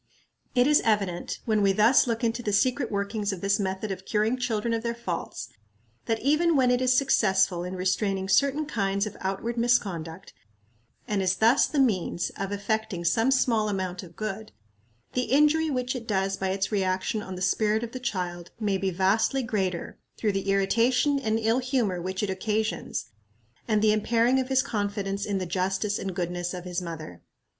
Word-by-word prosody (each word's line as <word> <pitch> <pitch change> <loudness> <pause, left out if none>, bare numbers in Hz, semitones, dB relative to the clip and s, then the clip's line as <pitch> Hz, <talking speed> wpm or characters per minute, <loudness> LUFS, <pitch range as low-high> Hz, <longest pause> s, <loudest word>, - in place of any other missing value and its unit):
It 245 0 +5
is 295 +1 +4
evident, 200 -5 -1
when 215 -2 +2
we 195 -1 +3
thus 225 +7 +5
look 230 0 -2
into 230 +1 0
the 210 - -2
secret 255 +4 +2
workings 200 +1 -1
of 190 -3 -6
this 200 +1 +1
method 190 +1 -2
of 190 -1 -5
curing 215 +4 +1
children 235 -2 -1
of 225 - -1
their 235 0 -2
faults, 185 -8 -5 0.6
that 225 -1 0
even 310 +4 +3
when 255 -2 +4
it 250 0 +2
is 255 0 +3
successful 190 -9 +2
in 180 +1 -5
restraining 190 +1 0
certain 280 +9 +2
kinds 200 -7 -1
of 210 - -6
outward 195 +5 -3
misconduct, 195 -8 -1 0.7
and 205 -2 0
is 185 0 +1
thus 230 +7 +4
the 300 - -4
means 195 -9 +1
of 195 0 -4
effecting 200 -3 -2
some 225 +8 +3
small 230 -5 +2
amount 185 -3 -3
of 170 -3 -13
good, 215 0 -5 0.6
the 250 0 0
injury 300 +3 +3
which 250 -2 -1
it 235 -2 -6
does 195 -2 0
by 190 - -2
its 195 +2 -1
reaction 195 +3 0
on 190 -2 -7
the 180 - -7
spirit 215 +3 +1
of 235 - -5
the 255 - -6
child 175 -7 -4
may 200 -3 0
be 195 0 0
vastly 195 +9 +1
greater, 190 -7 -2 0.2
through 215 - +1
the 195 0 -2
irritation 235 +8 +2
and 220 -4 0
ill 225 +2 +1
humor 245 -9 0
which 190 +3 -3
it 205 - -1
occasions, 215 +3 -2 0.6
and 215 -1 +2
the 215 -1 +5
impairing 230 +4 +2
of 260 - -1
his 265 -1 +3
confidence 205 -4 -2
in 200 -1 0
the 185 - -2
justice 190 +3 -1
and 190 -2 -4
goodness 175 0 -3
of 180 - -7
his 180 0 -3
mother. 160 - -7
210 Hz, 185 wpm, -26 LUFS, 190-235 Hz, 0.7 s, It